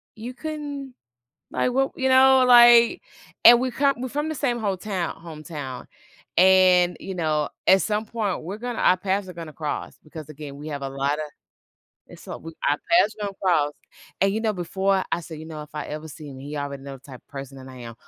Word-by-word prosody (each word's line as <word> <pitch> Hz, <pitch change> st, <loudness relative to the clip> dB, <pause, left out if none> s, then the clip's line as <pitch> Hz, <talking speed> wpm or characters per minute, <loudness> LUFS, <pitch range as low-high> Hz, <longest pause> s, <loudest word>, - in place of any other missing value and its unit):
"You 235 Hz, +3 st, -7 dB
couldn't, 285 Hz, -3 st, -6 dB, 0.6 s
like, 250 Hz, -, 0 dB
what" 270 Hz, +1 st, +1 dB
you 265 Hz, 0 st, 0 dB
know? 260 Hz, 0 st, +6 dB
Like, 240 Hz, -, +7 dB, 0.4 s
and 240 Hz, 0 st, +9 dB
we 255 Hz, 0 st, -1 dB
come 275 Hz, +2 st, +2 dB
we're 255 Hz, -, -3 dB
from 295 Hz, +4 st, -2 dB
the 315 Hz, -, -3 dB
same 245 Hz, -4 st, -1 dB
hometow 195 Hz, -4 st, -3 dB
hometown. 155 Hz, -5 st, -8 dB, 0.5 s
And, 185 Hz, -1 st, +5 dB
you 190 Hz, -, -6 dB
know, 155 Hz, -4 st, 0 dB, 0.2 s
at 190 Hz, 0 st, +6 dB
some 215 Hz, 0 st, -1 dB
point, 210 Hz, -7 st, -3 dB
we're 195 Hz, +6 st, -6 dB
gonna 245 Hz, 0 st, -5 dB
our 185 Hz, -, +4 dB
paths 190 Hz, +1 st, -2 dB
are -, -, -7 dB
gonna 165 Hz, -2 st, -9 dB
cross 150 Hz, 0 st, -5 dB
because, 155 Hz, 0 st, -10 dB
again, 145 Hz, -2 st, -9 dB
we 150 Hz, +2 st, -8 dB
have 140 Hz, -2 st, -5 dB
a 135 Hz, -, -3 dB
lotta 140 Hz, +3 st, -1 dB, 0.9 s
it's -, -, -14 dB
what -, -, -7 dB
we 165 Hz, 0 st, -8 dB, 0.2 s
our 145 Hz, -, +2 dB
paths 335 Hz, -, +4 dB
are 205 Hz, -, -1 dB
gonna 195 Hz, -, -6 dB
cross. 150 Hz, -6 st, +2 dB, 0.5 s
And, 195 Hz, 0 st, +3 dB
you 220 Hz, -, -1 dB
know, 220 Hz, -2 st, 0 dB
before 190 Hz, +1 st, 0 dB
I 175 Hz, -, +1 dB
said, 160 Hz, -2 st, -9 dB
"You 160 Hz, -, -9 dB
know, 155 Hz, -2 st, -7 dB
if 150 Hz, 0 st, -15 dB
I 150 Hz, -, -4 dB
ever 155 Hz, +1 st, -7 dB
see 150 Hz, 0 st, -10 dB
him," 130 Hz, -1 st, -10 dB
he 145 Hz, +2 st, -7 dB
already 140 Hz, -1 st, -5 dB
know 140 Hz, -1 st, -8 dB
the -, -, -20 dB
type 130 Hz, -2 st, -12 dB
of -, -, -58 dB
person 135 Hz, -1 st, -8 dB
that 130 Hz, 0 st, -11 dB
I 130 Hz, -, -11 dB
am. 115 Hz, -1 st, -9 dB
180 Hz, 220 wpm, -24 LUFS, 150-235 Hz, 0.9 s, and